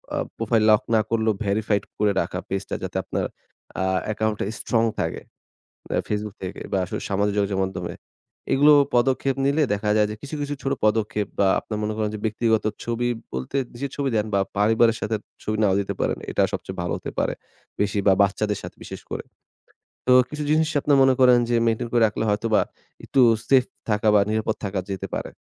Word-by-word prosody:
আ - - -1 0.2
profile 115 0 +1
lock 105 +3 +5
না 110 - +5
করলেও 110 -1 +2
verified 105 +1 +1 0.2
করে 105 -1 +3
রাখা - - -4
পেজটা 95 0 -3
যাতে - - -3
আপনার - - -2 0.6
আ - - +1 0.2
অ্যাকাউন্ট 110 0 -1
টা - - 0
স্ট্রং 115 -1 +1 0.2
থাকে। 80 -2 -3 0.7
আ - - +2
Facebook 105 -1 -3
থেকে 95 - -6
বা - - +2
আসলে 90 - -5
সামাজিক 100 +1 +1
যোগাযোগ 100 -1 0
মাধ্যমে। 90 -2 -5 0.6
এগুলো 145 +2 +6 0.2
পদক্ষেপ 130 +2 +2
নিলে 145 +3 +2
দেখা 105 +1 -1
যায় 105 -1 +4
যে - - -4
কিছু, 145 +2 -6
কিছু, 145 0 -2
ছোট 135 - 0
পদক্ষেপ 105 -1 +1
বা 100 - +5
আপনার 105 -1 -5
মনে 105 +1 -1
করেন 105 -1 0
যে 105 - -4
ব্যক্তিগত 110 0 +1 0.2
ছবি 120 +1 -1 0.3
বলতে 65 - -3 0.2
যে 140 - -1
ছবি 140 -1 0
দেন 105 - +1
বা 100 - +3 0.2
পরিবারের 115 +2 +4
সাথে 110 +1 -1 0.3
ছবি 110 0 -1
নাও 95 -2 +3
দিতে 100 - -3
পারেন। - - 0
এটা - - +1
সবচেয়ে - - -5
ভালো 85 - -2
হতে - - -6
পারে। - - +1 0.5
বেশি 105 0 +1
বা 95 - +7
বাচ্চাদের 105 +1 0
সাথে - - -9
বিশেষ - - -8
করে। - - -4 0.8
তো 125 - +5 0.2
কিছু 150 0 -4
জিনিস 155 0 +3
আপনি 145 - +1
মনে 135 0 +5
করেন 125 -1 +7
যে 120 - +3
maintain 115 +1 0
করে 120 - +3
রাখলে 105 +1 -2
হয়তোবা 110 +1 +2 0.4
একটু 135 - +2 0.3
সেফ 130 -2 +5 0.3
থাকা 105 +1 +2
বা 105 - +6
নিরাপদ 110 0 0
থাকা 100 -1 -2
যেতে 95 -2 -4
পারে। - - -4
110 Hz, 195 wpm, -24 LUFS, 105-120 Hz, 0.8 s, বা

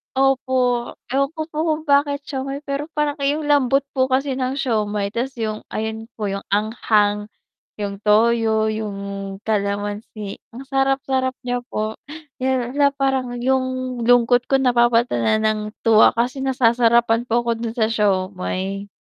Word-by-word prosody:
Opo, 260 -2 +1 0.2
ewan 275 +1 +1
ko 315 - -3
po 300 - -8
kung 310 0 0
bakit 285 -1 +2
siomai 275 +1 -5
pero 280 +1 -3
parang 295 0 0
'yong 285 +3 0
lambot 275 -2 +3
po 260 -1 +1
kasi 265 0 0
ng 260 0 -1
siomai 210 -6 -1
tapos 260 +4 -3
'yong 215 -2 -3
ayon 220 +1 -4
po 210 -3 -3
'yong 195 0 -5
anghang, 210 -1 +1 0.5
'yong 200 -1 -4
toyo, 220 0 +3
'yong 215 -2 -4 0.5
kalamansi 205 0 -3 0.2
ang 260 - -7
sarap 270 0 +1
sarap 260 -1 0
niya 245 0 -1
po. 215 -2 -3 1.0
Parang 265 -3 0
'yong 255 -1 -1
lungkot 245 0 +4
ko 270 - +2
napapalitan 240 - +3
na 220 - +3 0.2
ng 215 - -4 0.2
tuwa 220 -2 +6
kasi 245 +4 -1
nasasarapan 235 -2 +3
po 235 +1 +2
ko 235 - +1
do'n 230 -1 -4
sa 220 -3 +1
siomai. 195 -1 -1
240 Hz, 140 wpm, -21 LUFS, 215-265 Hz, 1.0 s, tuwa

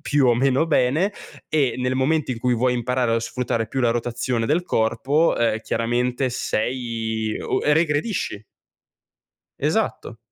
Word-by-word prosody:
più 145 -2 +2
o 120 - +5
meno 135 +5 +2
bene 155 +6 +2 0.4
e 145 -5 +1
nel 125 0 0
momento 140 +3 +1
in 115 - -6
cui 125 +1 +1
vuoi 125 +2 +1
imparare 125 -1 0
a 115 - +1
sfruttare 120 -1 -2
più 130 +5 -3
la 120 -2 +3
rotazione 120 0 -1
del 160 +7 +1
corpo, 130 +3 +1
ehm, 115 -2 +1
chiaramente 120 +3 0
sei 115 -2 -2
o - - -1
e 150 - +4
regredisci. 150 - 0 1.1
Esatto. - - -1
125 Hz, 145 wpm, -22 LUFS, 115-140 Hz, 1.1 s, o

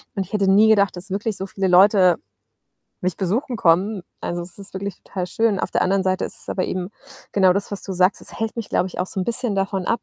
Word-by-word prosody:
Und 195 -2 -2
ich 185 - -19
hätte 200 -2 +2
nie 210 +3 +6
gedacht, 200 -3 +3
dass 185 +2 -2
wirklich 205 +2 -1
so 190 - -4
viele 195 0 -2
Leute 185 -1 +5 0.8
mich 185 -2 -2
besuchen 225 +7 -1
kommen. 185 +3 +2 0.2
Also, 175 0 -3
es 180 +3 -8
ist 195 -1 -10
wirklich 195 -1 -5
total 180 -2 -4
schön. 220 +1 0
Auf - - -3
der - - 0
anderen 190 +1 +1
Seite 185 0 0
ist - - -5
es - - -6
aber 185 - -1
eben 185 0 -4 0.4
genau 190 -2 +4
das, 200 +1 -1
was 200 - -1
du 195 - -5
sagst. 185 +2 +2
Es - - -1
hält 225 +1 -3
mich, 230 - -5
glaube 185 - 0
ich, - - -10
auch 180 - -1
so - - 0
'n - - -1
bisschen 235 -2 0
davon 195 -1 -2
ab, 230 - 0
195 Hz, 255 wpm, -21 LUFS, 185-205 Hz, 0.8 s, nie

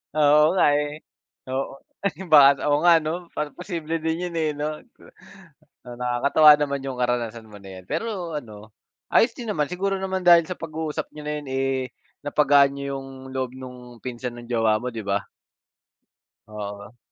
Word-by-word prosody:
Oo, 150 +3 +5
nga - - +4
eh. 150 +1 -4 0.5
Oo, 135 +1 -3 0.6
baka, 140 -2 +7
oo 145 - +3
nga 175 -1 +7
ano, 170 +3 -4
parang 150 -1 -3
posible 165 -3 -3
din 160 +2 -2
yun 170 - -9
eh, 155 -1 +1
no? 150 +1 -3 1.0
Nakakatawa 125 +5 +4
naman 140 -2 -2
yung 135 - -3
karanasan 120 -2 -2
mo 105 - -11
na 95 -2 -11
yan. - - -24
Pero 180 -9 -3
ano, 110 -4 -12 0.4
ayos 230 0 +4
din 235 -3 -6
naman 150 -7 0
siguro 195 +3 -2
naman 190 0 -3
dahil 170 -2 +6
sa 185 - -4
pag-uusap 160 -2 -5
niyo 150 - -10
na 150 - -2
yan, - - -13
eh, 135 0 0 0.5
napagaan 145 -1 +4
niyo 140 0 -4
yung 135 -1 -10
loob 130 -2 -2
nung 125 -2 -11
pinsan 120 0 -6
ng 120 - -10
jowa 115 -2 +2
mo, 125 +1 -5
di 110 - -4
ba? 100 0 -2 1.2
Oo. 105 +1 -8
140 Hz, 165 wpm, -24 LUFS, 120-160 Hz, 1.2 s, baka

